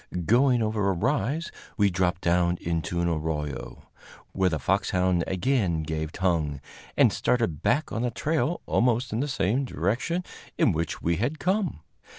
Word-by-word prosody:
Going 120 - +4
over 110 -2 0
a - - +2
rise, 140 - -1 0.3
we 100 -2 +3
dropped 90 0 0
down 85 0 +2
into 85 +1 -2
an 85 - +1
arroyo, 75 -3 -3 0.5
where 95 -1 +2
the 80 - -1
foxhound 90 +2 +1
again 95 -5 0
gave 80 0 -3
tongue, 80 -6 0 0.4
and - - +5
started 115 -12 0
back 145 +5 +1
on 115 - -2
the 125 - +1
trail 155 +5 -1
almost 125 +1 +1
in 110 - -1
the 145 - 0
same 120 0 0
direction 135 - -1 0.3
in - - +4
which 80 0 -3
we 85 0 +1
had 130 +9 -1
come. 185 - -1
95 Hz, 160 wpm, -26 LUFS, 85-125 Hz, 0.5 s, and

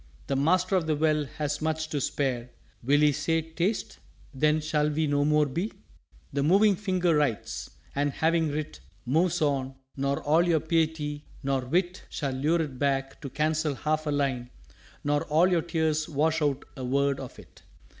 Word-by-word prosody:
The 135 - -1
Master 180 +7 +2
of 175 -4 +1
the 155 - +2
Well 155 0 +2
has 150 -1 -2
much 160 0 -1
to 145 -3 -2
spare: 125 -3 -1 0.3
Will 145 +4 +3
He 150 -1 +5
say, 155 +3 0
'Taste' 170 +6 -2 0.3
then 150 +3 +2
shall 150 -1 0
we 155 +1 0
no 145 -1 +1
more 150 0 +3
be?" 170 +10 -3 0.6
"_The 140 - 0
Moving 200 +6 +5
Finger 185 -3 +1
writes; 145 -8 -1 0.2
and 145 +1 +1
having 160 +1 +1
writ, 150 +1 -4 0.3
Moves 165 +6 +2
on; 135 -2 0 0.2
nor 140 0 0
all 155 +3 +4
your 165 -2 +3
Piety 155 -2 -1 0.2
nor 135 -1 0
Wit 175 +6 -1
Shall 140 -3 -3
lure 155 +6 +1
it 135 -5 -7
back 135 -1 -1
to 140 - -5
cancel 155 +1 0
half 155 +2 -1
a - - +1
line, 135 -4 -1 0.5
Nor 145 +2 +1
all 160 +4 +4
your 175 -3 +2
tears 160 -2 0
wash 160 +2 +1
out 145 -1 0
a 130 - -6
word 140 +2 +1
of 130 - -8
it. - - -16
150 Hz, 175 wpm, -27 LUFS, 140-160 Hz, 0.6 s, He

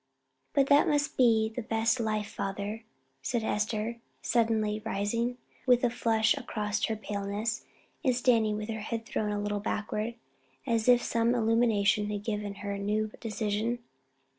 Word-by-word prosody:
"But 275 -2 +4
that 285 +1 +5
must 290 -1 +1
be 225 -3 +4
the 245 - -2
best 225 +2 +1
life, 215 -2 -1
father," 200 +3 -4 0.4
said 230 - -1
Esther, 215 +2 -1 0.3
suddenly 220 -2 +1
rising, 230 +3 -1 0.3
with 245 -1 +5
a 245 - +3
flush 220 -2 +2
across 210 0 -2
her 220 - -1
paleness, 210 +2 -3 0.4
and 255 -3 +3
standing 230 -4 +3
with 215 +1 -5
her 220 -1 -3
head 225 +1 -4
thrown 210 -1 -1
a 205 - -1
little 205 0 -1
backward, 215 +2 -2 0.5
as 230 0 +1
if 245 -1 +6
some 230 +1 +2
illumination 220 -3 +3
had 205 -1 -3
given 210 -2 -3
her 200 - -2
a 200 - -3
new 210 +2 0
decision. 220 +1 -1
220 Hz, 155 wpm, -30 LUFS, 210-235 Hz, 0.5 s, if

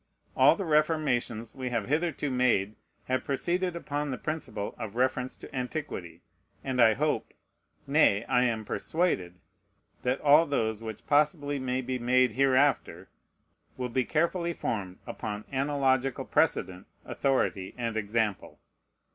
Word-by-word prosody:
All - - +6
the 195 - -4
reformations 150 -8 +1
we 130 -1 -4
have 115 -4 -2
hitherto 150 -1 0
made 120 -5 +2 0.3
have 130 0 -1
proceeded 175 +6 -1
upon 145 -3 -3
the 130 - -3
principle 130 -10 -4
of 110 -2 -6
reference 130 0 0
to - - -11
antiquity; 125 - -5 0.4
and 130 -2 0
I 110 -2 +6
hope, 150 +3 -1 0.5
nay, 140 -8 +4
I 125 0 +3
am 110 -3 -1
persuaded, 100 - -1 0.7
that 125 +2 0
all 150 +3 +6
those 110 -6 -1
which 110 -2 -7
possibly 145 -1 +2
may 130 0 -1
be 130 0 -3
made 125 0 +3
hereafter 130 -7 +2 0.7
will 125 -1 -3
be 130 +2 +1
carefully 170 +4 0
formed 95 - -3
upon 105 0 -5
analogical 135 -2 +1
precedent, 90 0 0 0.2
authority, 120 -8 -1
and 115 -2 -2
example. 110 -1 -2
130 Hz, 130 wpm, -28 LUFS, 110-145 Hz, 0.7 s, All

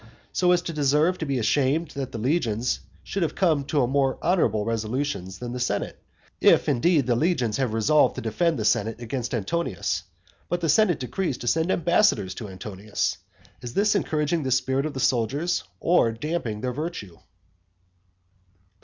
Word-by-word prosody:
so 180 -1 +3
as 175 0 +3
to 170 - -4
deserve 150 +4 +2
to 160 - -3
be 135 -1 0
ashamed 145 +7 +1
that 135 -2 -5
the - - -5
legions 120 -2 0 0.2
should 195 - -4
have 165 - -1
come 160 -7 +2
to 145 -2 +1
more 135 +1 +1
honourable 165 - +2
resolutions 110 -3 -2
than 120 0 -6
the 125 - -4
senate 105 -5 -2 0.4
if, - - +5
indeed, 150 +2 +3
the 120 -1 +2
legions 125 - +1
have 130 -4 0
resolved 130 +4 +3
to - - -4
defend 160 +9 0
the 110 - -2
senate 110 +2 +1
against 120 +1 -4
Antonius, 120 - -2 0.5
but 175 - 0
the 170 - -1
senate 180 0 +4
decrees 140 +3 -2
to 120 - -7
send 160 +8 +1
ambassadors 170 - +2
to 110 -4 -7
Antonius. 100 +2 -3 0.4
Is 120 0 -7
this 205 +1 +3
encouraging 160 -4 0
the 135 - -2
spirit 130 +3 +1
of 150 - -7
the - - -3
soldiers, 135 +5 0 0.2
or 170 -9 +3
damping 115 -3 -3
their 125 +1 -2
virtue? 135 - -6
135 Hz, 170 wpm, -25 LUFS, 115-165 Hz, 0.5 s, if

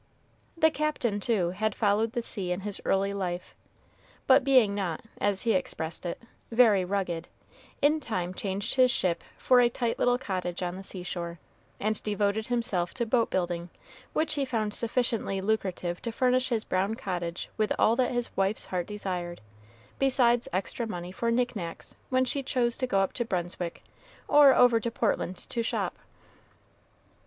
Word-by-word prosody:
The 320 -1 +5
Captain, 295 -9 -1
too, 195 -5 +1
had 215 +3 -1
followed 220 +1 +2
the 240 -2 -2
sea 190 -5 -3
in 180 +2 -1
his 205 0 -3
early 195 +1 +1
life, 180 -3 -4 0.7
but 265 0 +6
being 255 -7 +5
not, 185 -6 -2 0.2
as 200 -2 +1
he 230 - +3
expressed 170 -11 -2
it, 170 - -4 0.3
"very 225 -5 +5
rugged," 180 -3 -2 0.6
in 300 +2 +4
time 185 - -3
changed 195 +1 -2
his 255 -1 +5
ship 185 -9 0
for 250 -1 +4
a 240 - +4
tight 235 -1 -2
little 245 0 +3
cottage 185 -6 -3
on 175 0 -2
the 190 - -7
seashore, 175 -3 -5 0.4
and 215 +1 -1
devoted 210 +1 0
himself 210 -8 0
to 240 - 0
boat 230 0 +2
building, 175 -1 -2 0.4
which 315 - +1
he 285 -2 0
found 225 -5 -1
sufficiently 230 -4 0
lucrative 190 -4 -1
to 230 - -3
furnish 255 +2 +2
his 225 -3 0
brown 195 +4 0
cottage 175 -6 -4
with 215 -1 0
all 225 - +4
that 250 0 +2
his 245 -1 -2
wife's 195 +2 0
heart 180 -2 -3
desired, 180 -4 -4 0.6
besides 245 -3 +3
extra 195 +6 -2
money 175 -3 -5
for 230 +5 -1
knick 245 +1 +1
knacks 170 -4 -6
when 255 0 +3
she 275 +2 -1
chose 245 -3 +1
to 255 - -2
go 195 -5 +2
up 195 - 0
to 240 - -1
Brunswick 175 -4 -3 0.4
or 290 -2 +7
over 245 -2 +6
to 235 - -2
Portland 205 -5 -1
to 235 - -1
shop. 230 - -2
210 Hz, 165 wpm, -28 LUFS, 185-245 Hz, 0.7 s, or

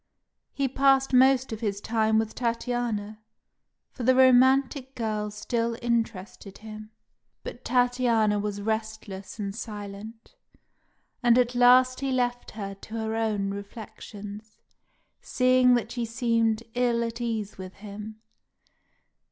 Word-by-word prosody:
He 275 -1 -1
passed 270 0 +3
most 260 0 +4
of 220 - -5
his 205 -3 -2
time 220 0 +1
with 220 0 0
Tatiana, 230 -3 -2 0.7
for - - -10
the 255 +2 +4
romantic 260 +1 +4
girl 215 -2 -2
still 230 +2 -2
interested 220 -4 -3
him; 215 0 -10 0.5
but 245 - -8
Tatiana 245 -4 +2
was 205 0 -4
restless 220 -3 -4
and 200 -2 -4
silent, 215 - -8 0.9
and 240 -1 +4
at 250 -1 +2
last 255 +1 +5
he 270 0 -2
left 245 -1 -1
her 195 -2 -5
to 210 +3 -11
her 220 -1 -2
own 210 -3 -1
reflections, 205 0 -9 0.6
seeing 255 -1 +4
that 235 -1 -2
she 240 -1 -3
seemed 230 -1 0
ill 240 -1 +1
at 230 +1 -5
ease 220 -4 -3
with 185 0 -8
him. 210 +2 -9
230 Hz, 125 wpm, -26 LUFS, 210-245 Hz, 0.9 s, last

